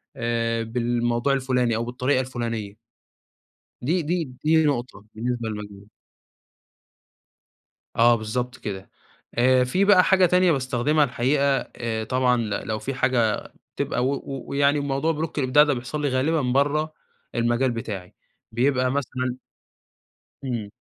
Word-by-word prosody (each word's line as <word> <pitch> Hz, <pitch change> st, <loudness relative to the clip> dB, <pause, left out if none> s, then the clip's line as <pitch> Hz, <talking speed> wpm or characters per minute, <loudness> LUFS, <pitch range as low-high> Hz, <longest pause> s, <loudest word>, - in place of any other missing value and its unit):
آآ، 115 Hz, -1 st, -1 dB
بالموضوع 120 Hz, +2 st, 0 dB
الفلاني، 125 Hz, -3 st, +1 dB
أو 115 Hz, +1 st, -2 dB
بالطريقة 130 Hz, +2 st, 0 dB
الفلانية. 115 Hz, -5 st, -5 dB, 1.0 s
دي 165 Hz, +9 st, +1 dB
دي 170 Hz, +3 st, -1 dB, 0.3 s
دي 160 Hz, +1 st, +4 dB
نقطة 125 Hz, -7 st, -2 dB
بالنسبة 120 Hz, 0 st, -2 dB
لمجالي. 105 Hz, -1 st, -8 dB, 2.1 s
آه، 120 Hz, +1 st, +5 dB
بالضبط 120 Hz, +3 st, -3 dB
كده، 95 Hz, -2 st, -6 dB, 0.5 s
آآ، 130 Hz, +1 st, +4 dB
في 180 Hz, +11 st, +1 dB
بقى 190 Hz, -3 st, +6 dB
حاجة 190 Hz, -1 st, +4 dB
تانية 180 Hz, 0 st, +4 dB
باستخدمها 135 Hz, +2 st, +1 dB
الحقيقة 140 Hz, +1 st, +1 dB, 0.3 s
آآ، 115 Hz, -2 st, -3 dB
طبعًا 125 Hz, +2 st, +2 dB
ل 115 Hz, -2 st, -2 dB, 0.2 s
لو 110 Hz, -1 st, -2 dB
في 135 Hz, -, -4 dB
حاجة 125 Hz, -5 st, +1 dB, 0.4 s
تبقى 125 Hz, -, -1 dB
و 140 Hz, -, +1 dB
و 135 Hz, -1 st, -6 dB
ويعني 140 Hz, +1 st, +3 dB
الموضوع 140 Hz, +3 st, 0 dB
block -, -, -15 dB
الإبداع 145 Hz, +2 st, +5 dB
ده 145 Hz, -2 st, +1 dB
بيحصل 125 Hz, +5 st, -5 dB
لي 145 Hz, -, +1 dB
غالبًا 140 Hz, +5 st, +1 dB
برّه 145 Hz, +5 st, +1 dB, 0.4 s
المجال 120 Hz, +2 st, +1 dB
بتاعي، 105 Hz, -6 st, -6 dB, 0.4 s
بيبقى 130 Hz, +2 st, +2 dB
مثلًا 130 Hz, -2 st, -2 dB, 1.1 s
إمم. 120 Hz, -6 st, -3 dB
125 Hz, 130 wpm, -24 LUFS, 115-140 Hz, 2.1 s, بقى